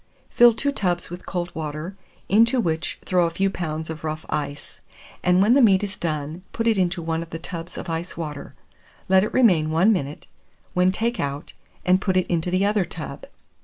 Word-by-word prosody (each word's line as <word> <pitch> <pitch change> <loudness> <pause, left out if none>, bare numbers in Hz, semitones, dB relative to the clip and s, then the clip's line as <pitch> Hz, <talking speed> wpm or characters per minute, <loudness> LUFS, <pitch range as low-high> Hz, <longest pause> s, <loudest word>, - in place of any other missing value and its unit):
Fill 240 0 +7
two 280 +5 -1
tubs 180 -10 -2
with 175 +1 -8
cold 175 -1 -3
water, 155 +4 -5 0.3
into 230 +5 +4
which 160 -7 -1
throw 180 -2 +3
a - - -1
few 195 +4 0
pounds 160 -3 -4
of 160 -1 -7
rough 155 0 -4
ice; 145 -1 -4 0.4
and 180 +1 +4
when 220 +4 +5
the 275 - +5
meat 200 -4 +5
is 200 -1 -3
done, 155 0 -3
put 225 - -2
it 225 -1 +4
into 180 -2 0
one 165 0 -1
of 165 - -8
the 165 - -5
tubs 165 0 -7
of - - -6
ice 165 +1 -4
water; 150 -4 -6 0.5
let 190 0 +5
it 215 - -2
remain 180 -12 +4
1 175 +8 +4
minute, 145 -6 -4 0.5
when 180 +1 +3
take 230 +5 -1
out, 140 +1 -4 0.3
and 185 +1 +4
put 190 -2 +1
it 185 - +2
into 170 0 -1
the 185 +2 +2
other 205 -1 +2
tub. 155 -5 -8
175 Hz, 200 wpm, -23 LUFS, 160-195 Hz, 0.5 s, Fill